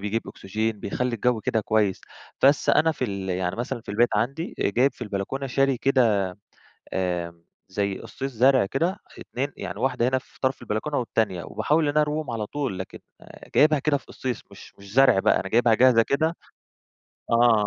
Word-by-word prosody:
بيجيب 105 +3 -1
أوكسجين 110 +2 -3
بيخلّي 125 +4 -2
الجو 120 0 +1
كده 110 - 0
كويّس. 105 -3 +1 0.4
بس 140 +1 +4
أنا 160 +2 +4
في 130 - -3
ال 100 -4 -4
يعني 90 0 -2
مثلًا 120 +1 -3
في - - -27
البيت 115 +4 +3
عندي 140 +8 -2
آآ - - +1
جايب 125 +7 +2
في - - -9
البلكونة 105 +6 -3
شاري 135 +1 +1
كده 120 -7 +3 0.7
آمم 85 -2 -3 0.3
زي 100 0 -2
أصِّيص 135 0 -6
زرع 130 +1 +4
كده 135 +11 0
اه 190 - -6 0.2
2 135 +4 -4
يعني 90 +2 -6
واحدة 125 -1 +1
هنا 130 +1 +2
في - - -12
طرف 130 -1 0
البلكونة 120 +6 -2
والتانية. 105 -7 -1
وباحاول 155 +1 0
إن 145 +1 0
أرويهم 150 -3 0
على 110 -2 -3
طول 135 -6 -4
لكن 95 - -7 0.6
جايبها 150 0 +5
كده 145 +1 +1
في - - -19
أصِّيص 130 -2 -4
مش - - -13
مش 100 0 -12
زرع 130 -4 +5
بقى، - - +3
أنا 95 - -5
جايبها 120 0 +4
جاهزة 120 0 +5
كده 160 +7 0 1.0
آه، 120 0 +5
120 Hz, 185 wpm, -25 LUFS, 100-135 Hz, 1.0 s, جايبها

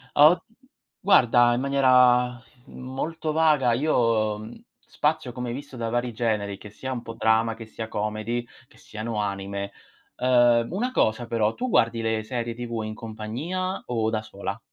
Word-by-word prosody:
Ah, 145 +1 +9
od 180 - +1 0.6
guarda 120 - +5
in 120 - -1
maniera 125 -3 +4 0.3
molto 155 +5 -4
vaga 150 -6 +3
io, 115 -6 +1
mhmm, 110 - -11 0.2
spazio 150 -4 -1
come 125 0 -5
hai - - -3
visto 140 0 -9
da 115 -1 -2
vari 120 0 -1
generi, 105 -3 -1
che 105 - -11
sia 130 +6 -6
un 125 -2 -3
po' 115 -1 -8
drama, 115 0 +2
che 115 0 -9
sia 110 0 -7
comedy, 110 +3 -3 0.2
che - - -23
siano 115 -6 -6
anime. 100 0 -4 0.5
Ehm, 120 -2 +4
una 235 +8 -1
cosa 115 - +1
però: 110 -1 +1
tu 255 - -3
guardi 115 - +2
le 110 -1 -1
serie 120 +1 -3
TV 120 -2 -4
in 110 0 -5
compagnia 120 - -4
o 115 -2 0
da 110 -1 -1
sola? 100 -1 -6
120 Hz, 165 wpm, -25 LUFS, 110-130 Hz, 0.6 s, Ah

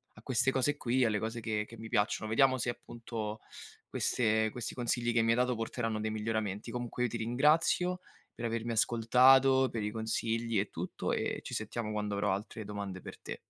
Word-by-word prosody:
a 105 - -14
queste 130 +1 +2
cose 135 +2 +1
qui, 130 -2 +1
alle 110 -2 +1
cose 110 +2 -3
che 110 -2 -1
che 115 - -13
mi 110 +1 -8
piacciono. 110 +1 0
Vediamo 130 +4 +4
se 125 - -1
appunto 115 -3 -6 0.5
queste 110 -2 +1
questi 120 0 -5
consigli 120 -1 0
che 115 - +4
mi 115 - +1
hai 115 - +2
dato 125 0 +2
porteranno 115 -1 -2
dei 110 0 -1
miglioramenti. 110 -2 -2
Comunque 120 0 -3
io 125 - +1
ti - - -6
ringrazio 155 +9 +2 0.3
per - - -9
avermi 115 0 -2
ascoltato, 130 +4 +5
per 115 - -3
i 105 - -2
consigli 115 0 -1
e 100 - -1
tutto, - - -3
ehm, - - -1
ci - - -8
sentiamo 110 0 -3
quando 105 -1 -2
avrò 100 -1 +1
altre 105 +2 -5
domande 100 -2 -5
per - - -10
te. - - -6
115 Hz, 195 wpm, -32 LUFS, 110-125 Hz, 0.5 s, ascoltato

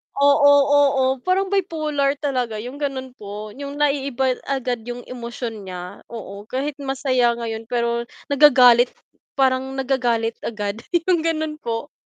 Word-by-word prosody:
Oo, 285 0 +5 0.2
oo 280 -2 +4 0.2
parang 380 +1 +1
bipolar 305 -7 0
talaga 255 -6 -2
yung 265 +4 -8
ganun 265 -3 -3
po, 210 +1 -7
yung 280 0 -6
naiiba 275 -3 0
agad 255 -3 -1
yung 245 0 -6
emosyon 235 -4 -6
niya 180 +1 -7
oo. 205 -2 -9
Kahit 275 +2 -3
masaya 255 -3 +1
ngayon 225 -1 -5
pero 235 -1 -1 0.2
nagagalit 250 -4 +7 0.5
parang 265 0 +1
nagagalit 245 -4 0
agad 210 -1 -4 0.3
yung 360 -3 +3
ganun 315 -2 -2
po 230 +4 -4
260 Hz, 130 wpm, -22 LUFS, 235-285 Hz, 0.5 s, nagagalit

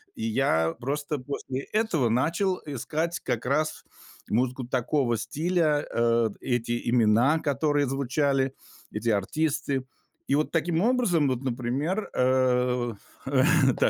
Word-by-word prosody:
и 225 - -6
я 80 - +1
просто 145 +3 -2
после 135 0 -5
этого 200 - +1
начал 170 - +1
искать 155 +5 -3
как 120 -2 -2
раз 155 +4 -1 0.4
музыку 125 +2 0
такого 125 -1 0
стиля, 155 +3 0
э, 115 -1 +2
эти 120 -1 -1
имена, 120 +6 +4
которые 145 0 +1
звучали, 135 0 0 0.4
эти 110 +2 -2
артисты. 135 +5 0 0.4
И 140 - +2
вот 150 - 0
таким 165 +1 +1
образом, 215 - +2
вот, 130 -1 -1
например, 135 - -2
э 125 -2 +2 0.3
э, 135 -1 +3 0.3
да, - - +2
135 Hz, 120 wpm, -26 LUFS, 120-155 Hz, 0.4 s, имена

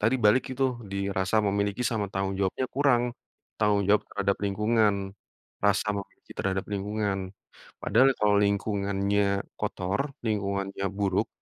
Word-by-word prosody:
tadi 115 +5 +3
balik 105 +5 +6
itu, 135 +1 +1 0.3
di 100 - -3
rasa 95 +2 0
memiliki 100 +3 0
sama 105 -3 -1
tanggung 95 0 -2
jawabnya 100 +6 0
kurang. 135 -3 +3 0.6
Tanggung 105 -2 +3
jawab 105 +1 +4
terhadap 100 -1 0
lingkungan, 105 +1 +2 0.7
rasa 100 0 +2
mengakui 100 -1 -8
terhadap 95 0 -1
lingkungan. 100 0 -1 0.6
Padahal 125 +6 +5
kalau 105 -1 +3
lingkungannya 100 0 0 0.2
kotor, 95 +2 -1 0.3
lingkungannya 100 -2 -1
buruk, 100 -1 0
100 Hz, 125 wpm, -27 LUFS, 100-105 Hz, 0.7 s, balik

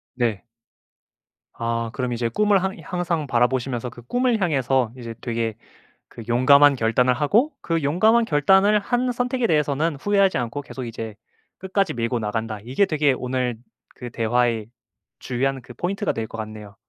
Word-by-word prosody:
네. 120 -5 -1 1.1
아 115 0 -2
그럼 125 -2 -2
이제 120 0 -1
'꿈을 205 - +2
항 190 0 -2
항상 175 -4 -2
바라보시면서 125 0 0
그 120 - -13
꿈을 245 - +1
향해서 135 -8 +1
이제 115 -2 -7
되게 115 -2 -2 0.5
그 115 - -10
용감한 140 +4 +6
결단을 125 +1 +2
하고 205 - +2
그 165 -1 -1
용감한 215 +11 +3
결단을 195 +6 +4
한 245 +4 0
선택에 245 0 -1
대해서는 150 +1 +1
후회하지 200 -2 +2
않고 125 +4 -3
계속 135 -2 -8
이제 110 -2 -6 0.4
끝까지 190 -3 0
밀고 120 +1 -1
나간다.' 110 0 -3
이게 130 - +1
되게 150 -4 +2
오늘 125 -2 -2 0.4
그 125 -1 -7
대화의 115 -1 0 0.5
주요한 135 +1 -2
그 120 - -13
포인트가 195 - -2
될 110 -1 -4
것 115 - -9
같네요. 105 -2 -8
130 Hz, 325 characters per minute, -23 LUFS, 115-185 Hz, 1.1 s, 용감한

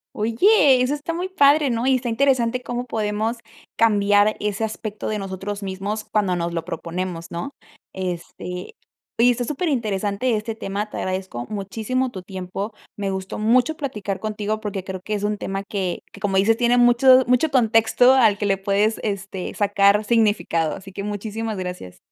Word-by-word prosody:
Oye 260 - +4
eso 255 +3 +1
está 295 +3 -4
muy 360 +3 -3
padre 290 -4 +4
¿no? 235 +1 -1
Y 265 - +4
está 245 -1 -2
interesante 250 -1 +2
cómo 245 +1 -4
podemos 220 +1 -2 0.4
cambiar 205 -1 +3
ese 210 +1 -2
aspecto 215 -1 -4
de 215 -1 -2
nosotros 195 +1 -5
mismos 200 +3 -4
cuando 200 -4 0
nos 170 0 -2
lo 165 -1 -2
proponemos 170 0 -5
¿no? 170 +11 -4 0.4
Este, 180 - -6 0.4
oye 245 +1 +6
está 245 0 -1
superinteresante 235 - -1
este 215 +1 -3
tema, 210 -1 -4
te - - -7
agradezco 185 -10 -3
muchísimo 220 +5 -2
tu 185 - -7
tiempo. 190 +3 -6 0.2
Me 200 -1 -3
gustó 190 0 -5
mucho 245 +8 +3
platicar 210 -9 -4
contigo 215 0 -3
porque 200 -3 -4
creo 190 -1 -6
que 210 +3 -4
es 205 -1 -2
un 210 0 0
tema 195 0 -4
que 195 -3 -3
que - - -13
como 195 -2 0
dices, 220 +4 +3
tiene 240 0 +3
mucho 250 +2 +6
mucho 250 +5 +3
contexto 240 0 +4
al 225 -6 +4
que 205 - -2
le 195 -1 +2
puedes, 200 +3 +1
este, 200 -3 -4
sacar 205 0 +3
significado, 205 -8 +1
así 195 0 -11
que 200 +1 -6
muchísimas 210 +1 -4
gracias. 180 - -6
210 Hz, 170 wpm, -22 LUFS, 195-240 Hz, 0.4 s, oye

